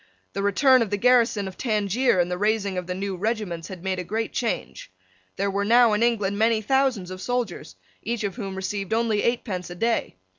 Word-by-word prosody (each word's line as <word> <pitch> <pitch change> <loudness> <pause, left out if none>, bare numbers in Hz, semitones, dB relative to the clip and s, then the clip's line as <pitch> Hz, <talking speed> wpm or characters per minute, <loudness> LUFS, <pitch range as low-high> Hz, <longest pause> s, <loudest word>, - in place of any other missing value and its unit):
The - - -2
return 255 +6 +4
of 225 - 0
the 205 - -1
garrison 230 -3 +3
of 190 - -10
Tangier 215 -1 +1
and 175 0 +1
the 180 - -1
raising 210 -2 0
of 180 -1 -4
the 180 - -3
new 195 0 -3
regiments 190 -4 -3
had 185 -3 -9
made 190 -1 -1
a - - -3
great 220 +5 -3
change. 230 - -3 0.4
There 200 +1 -1
were 200 +1 0
now 235 +1 +5
in 210 - +1
England 210 -4 +1
many 225 0 +3
thousands 245 -5 0
of 185 0 -7
soldiers, 235 - -3 0.3
each 235 0 -3
of 200 -2 -2
whom 195 -5 -5
received 195 +2 -2
only 225 -2 +1
eightpence 205 -7 -2
a 175 - -7
day. 230 - -1
205 Hz, 210 wpm, -24 LUFS, 190-230 Hz, 0.4 s, now